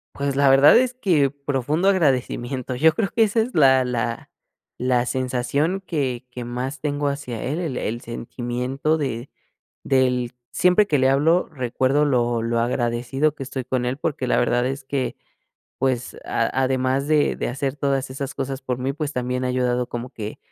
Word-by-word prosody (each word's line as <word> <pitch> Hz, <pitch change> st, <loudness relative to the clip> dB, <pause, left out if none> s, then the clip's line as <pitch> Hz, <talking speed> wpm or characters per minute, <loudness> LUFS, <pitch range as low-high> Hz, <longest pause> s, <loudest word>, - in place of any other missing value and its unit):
Pues, 140 Hz, -1 st, -1 dB
la 140 Hz, -1 st, +4 dB
verdad 135 Hz, +2 st, +7 dB
es 255 Hz, 0 st, +2 dB
que 165 Hz, -, +2 dB
profundo 145 Hz, +5 st, -1 dB
agradecimiento. 130 Hz, -6 st, 0 dB
Yo 160 Hz, +5 st, +4 dB
creo 200 Hz, 0 st, -1 dB
que 225 Hz, -, +3 dB
esa 220 Hz, +2 st, +2 dB
es 240 Hz, +3 st, -3 dB
la 130 Hz, -4 st, +5 dB
la 120 Hz, -1 st, -3 dB, 0.5 s
la 125 Hz, -1 st, +1 dB
sensación 130 Hz, +8 st, -1 dB
que 135 Hz, -7 st, -2 dB
que 120 Hz, -1 st, -6 dB
más 125 Hz, +4 st, -4 dB
tengo 145 Hz, -1 st, -1 dB
hacia 135 Hz, -5 st, -5 dB
él. 150 Hz, +7 st, -2 dB
El 155 Hz, -8 st, -3 dB
el 115 Hz, +2 st, -3 dB
sentimiento 125 Hz, +6 st, -2 dB
de 130 Hz, -3 st, -3 dB, 0.5 s
del 125 Hz, -2 st, +1 dB, 0.2 s
siempre 180 Hz, +3 st, +4 dB
que 145 Hz, -, +2 dB
le 130 Hz, 0 st, +4 dB
hablo, 160 Hz, +6 st, +3 dB
recuerdo 130 Hz, +1 st, +1 dB
lo 120 Hz, -4 st, +1 dB
lo 115 Hz, 0 st, 0 dB
agradecido 120 Hz, +5 st, 0 dB
que 135 Hz, -, -6 dB
estoy 130 Hz, -1 st, -5 dB
con 125 Hz, -1 st, -1 dB
él, 130 Hz, +3 st, -2 dB
porque 145 Hz, -4 st, -2 dB
la -, -, +2 dB
verdad 120 Hz, 0 st, +2 dB
es 135 Hz, +1 st, -3 dB
que, 135 Hz, -1 st, -2 dB, 0.6 s
pues, 130 Hz, -2 st, -1 dB
a -, -, 0 dB, 0.2 s
además 130 Hz, +2 st, 0 dB
de 150 Hz, -2 st, +3 dB
de -, -, -2 dB
hacer 135 Hz, +2 st, -3 dB
todas 135 Hz, -2 st, -1 dB
esas 135 Hz, +1 st, -5 dB
cosas 135 Hz, 0 st, -4 dB
por 125 Hz, -2 st, -3 dB
mí, 130 Hz, +2 st, -1 dB
pues, 150 Hz, 0 st, -4 dB
también 125 Hz, 0 st, -2 dB
ha 125 Hz, -, 0 dB
ayudado 125 Hz, -1 st, 0 dB
como 120 Hz, +2 st, -5 dB
que 105 Hz, -4 st, -7 dB
130 Hz, 180 wpm, -23 LUFS, 125-145 Hz, 0.6 s, verdad